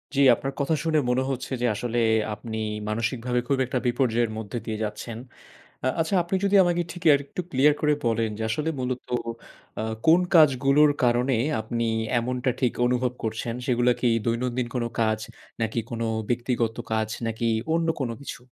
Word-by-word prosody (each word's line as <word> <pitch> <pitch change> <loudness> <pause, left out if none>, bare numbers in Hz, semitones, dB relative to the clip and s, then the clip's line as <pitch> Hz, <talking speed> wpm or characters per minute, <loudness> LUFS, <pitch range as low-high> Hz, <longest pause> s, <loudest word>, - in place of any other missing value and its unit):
জি, - - +1 0.2
আপনার 135 +3 -5
কথা 145 +3 +1
শুনে 160 -1 +1
মনে 125 +1 +2
হচ্ছে 130 +1 -5
যে - - +2
আসলে 120 +2 -3 0.4
আপনি 110 +1 -6 0.3
মানসিকভাবে 115 +3 -1
খুব 140 - +2
একটা 130 +1 -2
বিপর্যয়ের 120 -2 +1
মধ্যে 110 +1 -5
দিয়ে 110 -1 -3
যাচ্ছেন। 110 +2 -5 0.7
আ - - +1
আচ্ছা 165 +4 0
আপনি 175 +3 -1
যদি 200 0 +4
আমাকে 175 -1 +1
ঠিক 175 - -10
আর 140 - +5
একটু 160 - -5
ক্লিয়ার 145 +2 +4
করে 150 -1 +3
বলেন 115 -1 +1
যে - - -3
আসলে 150 +6 -1
মূলত 125 0 -2 0.8
আ - - -1 0.2
কোন 165 +3 +7
কাজগুলোর 145 -1 +5
কারণে 125 +2 +2 0.3
আপনি 115 +1 -2 0.3
এমনটা 125 +2 -1
ঠিক 125 -3 +2
অনুভব 125 0 +1
করছেন, 115 +1 -3
সেগুলো 125 -1 +3
কি - - +1 0.2
দৈনন্দিন 120 +1 -1
কোন 125 -2 0 0.2
কাজ? 110 -1 +2 0.4
নাকি 115 +1 -1
কোন 115 -1 -4 0.3
ব্যক্তিগত 120 -2 0 0.2
কাজ, 110 -1 +1 0.2
নাকি 115 +1 -3 0.3
অন্য 165 0 +1
কোন 130 -3 -1
কিছু? 135 - -7
125 Hz, 170 wpm, -25 LUFS, 115-135 Hz, 0.8 s, কোন